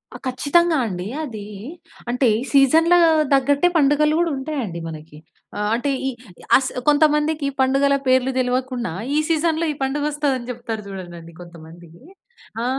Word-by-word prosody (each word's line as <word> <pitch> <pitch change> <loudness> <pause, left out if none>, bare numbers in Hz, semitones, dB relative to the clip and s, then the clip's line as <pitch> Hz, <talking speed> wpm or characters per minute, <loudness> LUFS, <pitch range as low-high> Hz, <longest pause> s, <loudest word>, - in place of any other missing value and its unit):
ఆ! - - -6
ఖచ్చితంగా 310 +6 +2
అండి. 180 -1 -5 0.2
అది 220 -8 -7 0.6
అంటే 250 +1 +1 0.3
సీజన్ల 320 +6 +5 0.4
తగ్గట్టే 280 +5 +3
పండుగలు 300 +1 +3
కూడా 335 -2 0
ఉంటాయి 290 +2 -4
అండి 170 -4 -6
మనకి. 155 -1 -11 0.4
ఆహ్, 210 - -1
అంటే 245 +4 -2 0.7
అస్ 260 - -2 0.2
కొంతమందికి 300 0 +2
పండుగల 275 +2 +2
పేర్లు 260 0 +3
తెలవకుండా 250 -4 -1 0.2
ఈ - - +2
సీజన్‌లో 325 0 +1
ఈ - - -4
పండుగ 275 +2 -1
వస్తుంది 290 -2 -1
అని 240 -1 -9
చెప్తారు 230 -3 -6
చూడండండి 175 -4 -9
కొంతమంది. 170 -1 -13 0.7
ఆ! - - -2
265 Hz, 135 wpm, -21 LUFS, 215-295 Hz, 0.7 s, సీజన్ల